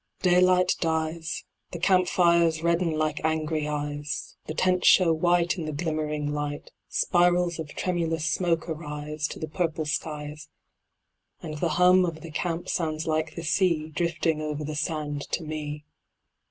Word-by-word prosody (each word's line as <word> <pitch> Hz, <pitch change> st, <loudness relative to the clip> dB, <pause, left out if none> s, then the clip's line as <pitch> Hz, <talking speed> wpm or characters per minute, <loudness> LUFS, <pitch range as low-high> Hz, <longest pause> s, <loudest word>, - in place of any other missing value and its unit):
Daylight 180 Hz, 0 st, +4 dB
dies, 160 Hz, 0 st, -2 dB, 0.3 s
The -, -, -3 dB
Camp 180 Hz, +1 st, +3 dB
fires 170 Hz, -3 st, +3 dB
redden 170 Hz, 0 st, +2 dB
like 155 Hz, 0 st, -1 dB
angry 155 Hz, -1 st, 0 dB
eyes, 145 Hz, 0 st, -4 dB
The 155 Hz, -, -4 dB
Tents 180 Hz, 0 st, +2 dB
show 175 Hz, -3 st, +6 dB
white, 175 Hz, +2 st, +2 dB
In 165 Hz, -, -3 dB
the 155 Hz, -, -3 dB
glimmering 150 Hz, -1 st, -2 dB
light, 145 Hz, 0 st, -4 dB, 0.2 s
Spirals 175 Hz, -1 st, +2 dB
of 155 Hz, -2 st, -6 dB
tremulous 165 Hz, -3 st, -1 dB
smoke 165 Hz, +1 st, 0 dB
arise, 150 Hz, -1 st, -4 dB
to -, -, -8 dB
the 155 Hz, -, -4 dB
purple 160 Hz, -1 st, -2 dB
skies, 150 Hz, 0 st, -4 dB, 0.9 s
And 155 Hz, -2 st, -5 dB
the 170 Hz, -, +1 dB
hum 180 Hz, +1 st, +6 dB
of 165 Hz, -3 st, -3 dB
the 165 Hz, -, -9 dB
Camp 170 Hz, +2 st, -2 dB
sounds 155 Hz, -2 st, -1 dB
like 155 Hz, -1 st, -1 dB
the 170 Hz, -, -5 dB
sea, 160 Hz, -2 st, +1 dB
Drifting 160 Hz, -1 st, 0 dB
over 150 Hz, 0 st, -3 dB
the 150 Hz, +1 st, -4 dB
sand 150 Hz, -2 st, -2 dB
to 170 Hz, -, 0 dB
me. 150 Hz, -1 st, -5 dB
160 Hz, 155 wpm, -26 LUFS, 150-175 Hz, 0.9 s, show